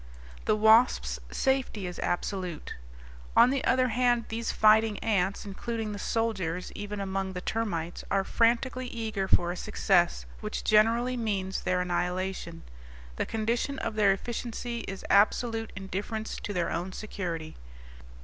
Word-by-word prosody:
The 215 - +3
wasp's 220 +3 +4
safety 265 -7 0
is 180 -1 -6
absolute. 180 -2 -3 0.6
On 250 - +7
the 275 -1 0
other 255 0 +3
hand, 240 0 +2
these 230 +1 -2
fighting 215 0 +4
ants, 200 -3 0
including 220 +2 -4
the 205 - -5
soldiers 190 -8 -1
even 205 0 -5
among 195 -1 -2
the 180 - -4
termites, 180 -5 -3
are 195 -1 +2
frantically 240 +4 +1
eager 220 -5 -3
for 175 -2 +3
a - - -4
success 175 - +1
which - - -4
generally 230 +4 +3
means 195 -5 -2
their 180 0 +1
annihilation; 180 -1 -2 0.5
the - - -1
condition 235 +5 -1
of 220 - -3
their 210 -2 +4
efficiency 235 +3 -3
is 195 -1 -6
absolute 225 +2 +3
indifference 200 +4 -4
to - - -5
their 175 -4 -1
own 180 +3 -3
security. 170 -7 -5
210 Hz, 140 wpm, -28 LUFS, 185-230 Hz, 0.6 s, On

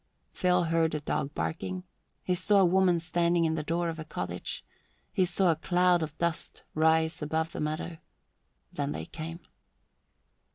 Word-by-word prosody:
Phil 180 -1 +2
heard 165 -1 +1
a - - 0
dog 140 -1 -2
barking; 180 +3 -3 0.4
he 180 - +1
saw 200 +3 +3
a 190 - +6
woman 180 -1 +4
standing 170 0 +2
in 160 - +1
the 160 - -1
door 170 +3 -1
of 165 -1 -4
a - - -4
cottage; 90 - -4 0.5
he 185 - +3
saw 185 0 +3
a - - +1
cloud 180 +1 +3
of 160 -1 -4
dust 170 -1 -2
rise 160 +1 +2
above 160 +2 -1
the - - -5
meadow; 155 +2 -3 0.7
then 70 - -2
they 80 +1 -5
came. 165 - -7
165 Hz, 165 wpm, -29 LUFS, 160-175 Hz, 0.7 s, a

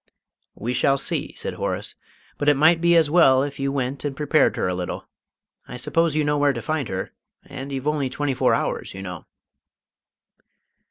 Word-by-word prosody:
"We 120 +2 -3
shall 135 +2 +2
see," - - -2
said - - -5
Horace. - - -3 0.5
"But 145 - +3
it 145 - +5
might 160 +3 +5
be 170 0 +4
as 160 -3 +4
well 135 -6 +5
if 140 0 -5
you 135 0 0
went 135 0 -2
and 145 -2 -3
prepared 150 +2 +2
her - - -1
a 90 - -1
little. 90 0 -5 0.6
I - - -7
suppose 165 +5 +1
you 155 - +2
know 145 0 +1
where 145 -1 +3
to 120 - -5
find 155 -1 -2
her - - -4 0.3
and 135 +1 -7
you've 135 +1 -4
only 150 -3 0
twenty 140 +1 -2
four - - +2
hours, - - -3
you 95 - -7
know." 90 -3 -8
140 Hz, 195 wpm, -23 LUFS, 130-150 Hz, 0.6 s, it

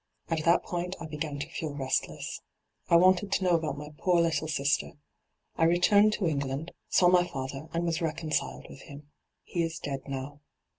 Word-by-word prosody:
At 160 -2 0
that 170 +1 +4
point 180 +1 -3
I 165 - -6
began 150 -1 -4
to 145 +2 -4
feel 160 -2 -5
restless. 135 -2 -2 0.5
I - - +6
wanted 185 +3 +5
to - - +1
know 180 - +3
about 160 -4 0
my 150 +1 -8
poor 180 -2 +3
little 165 -1 +1
sister. 145 -2 0 0.6
I 165 - +4
returned 200 +5 +5
to 210 - -1
England, 140 +1 -2 0.2
saw 180 - +5
my 175 0 +5
father, 135 -1 -5
and 170 +1 -1
was 165 -1 -1
reconciled 160 -1 -2
witii - - -12
him. 145 +1 -12 0.3
He 175 - -2
is 165 0 -2
dead 140 -1 -4
now. 135 +1 -5
160 Hz, 185 wpm, -29 LUFS, 145-175 Hz, 0.6 s, I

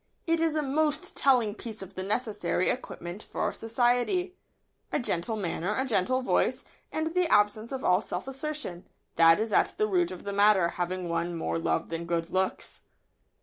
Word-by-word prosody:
It 330 -1 +2
is 325 -2 +1
a 305 - +1
most 295 +2 0
telling 245 -6 +3
piece 220 -2 -6
of 190 - -12
the 185 - -5
necessary 205 -3 0
equipment 175 -5 -6
for - - -3
society. 245 - +1 0.6
A - - +1
gentle 220 -2 -1
manner, 190 0 -2
a 265 - +1
gentle 255 +2 +1
voice, - - +1 0.3
and 320 +1 -2
the 360 -2 +1
absence 210 +3 +3
of 265 -1 -4
all 180 +2 +4
self - - -5
assertion, 270 - -5 0.3
that 165 +1 +7
is 220 -1 -2
at - - +2
the 215 - +2
root 180 -4 +1
of 185 -1 -8
the 200 - -4
matter, 200 -3 +4
have 175 0 -2
won 170 0 -2
more 165 - -2
love 165 - -1
than 165 0 -4
good 170 0 -2
looks. 190 0 -2
210 Hz, 180 wpm, -28 LUFS, 175-265 Hz, 0.6 s, that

